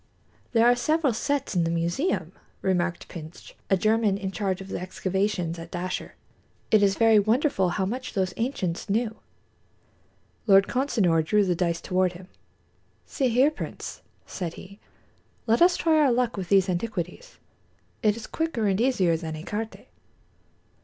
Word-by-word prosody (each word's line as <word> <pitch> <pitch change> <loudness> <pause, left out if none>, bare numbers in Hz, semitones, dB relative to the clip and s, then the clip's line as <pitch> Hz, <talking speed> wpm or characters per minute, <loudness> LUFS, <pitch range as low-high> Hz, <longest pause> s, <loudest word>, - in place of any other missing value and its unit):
"There 230 -1 +5
are 245 +1 +6
several 305 +1 +1
sets 275 +1 -2
in 175 - +3
the 165 - 0
museum," 170 - -1 0.3
remarked 180 -2 0
Pintsch, 160 -1 -10 0.2
a 195 - +4
German 215 0 +2
in 195 -2 -4
charge 195 -2 -2
of 195 0 -9
the - - -3
excavations 185 -1 -2
at 165 0 -9
Dashur. 180 +1 -4 0.6
"It 215 - +5
is 195 -1 +3
very 225 -2 +5
wonderful 215 - +2
how 190 +2 -1
much 250 +6 -4
those 190 -2 -1
ancients 200 -9 -3
knew." 225 +2 0 1.3
Lord 195 -1 +7
Consinor 210 - +2
drew 205 +5 +2
the 180 - +1
dice 170 -1 -1
toward 185 -1 +1
him. 180 +1 -12 0.8
"See 270 - -1
here, 255 +6 +4
Prince," - - -7 0.2
said 175 -4 -5
he, 200 +2 -12 0.7
"let 230 +4 +2
us 355 +1 +6
try 320 -2 +3
our 285 -4 +4
luck 240 -1 +1
with 185 -4 -5
these 195 -1 +4
antiquities. 185 - -4 0.6
It 210 0 +2
is 225 - -7
quicker 320 -9 -2
and 200 +1 +1
easier 195 -10 +2
than 160 -1 -5
écarté." 210 +8 -5
200 Hz, 155 wpm, -26 LUFS, 180-235 Hz, 1.3 s, Lord